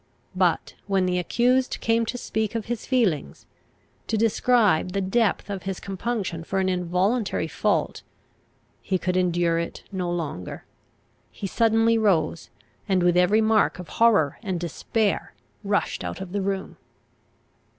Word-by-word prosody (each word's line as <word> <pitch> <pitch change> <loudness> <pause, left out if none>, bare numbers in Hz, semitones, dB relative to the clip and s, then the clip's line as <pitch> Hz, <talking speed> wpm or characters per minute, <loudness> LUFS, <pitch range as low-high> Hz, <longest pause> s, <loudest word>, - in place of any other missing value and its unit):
But - - +1
when 195 -2 +2
the 180 0 +1
accused 250 +8 +1
came 230 0 +1
to 245 - -3
speak 220 -2 -2
of 225 -3 -2
his 240 -2 -4
feelings, 190 - 0 0.6
to 220 - 0
describe 215 -5 +2
the 200 - 0
depth 195 +2 +1
of 200 -2 -4
his 190 0 -4
compunction 195 -4 -3
for 195 - -3
an 190 0 +1
involuntary 185 +5 0
fault, - - -1 0.8
he 190 - 0
could 180 0 -2
endure 175 -2 +2
it 170 - -5
no 185 -3 -2
longer. 160 - -4 0.6
He - - -8
suddenly 225 +2 +3
rose, 170 -6 +1 0.4
and 185 -2 +2
with 175 0 +3
every 180 +5 +4
mark 220 -1 +3
of 180 -2 -9
horror 205 -11 +4
and 190 -5 -3
despair 195 +5 -1 0.3
rushed 205 0 -1
out - - -5
of 190 -2 -7
the 200 +1 -1
room. 195 0 -3
195 Hz, 145 wpm, -25 LUFS, 180-225 Hz, 0.8 s, every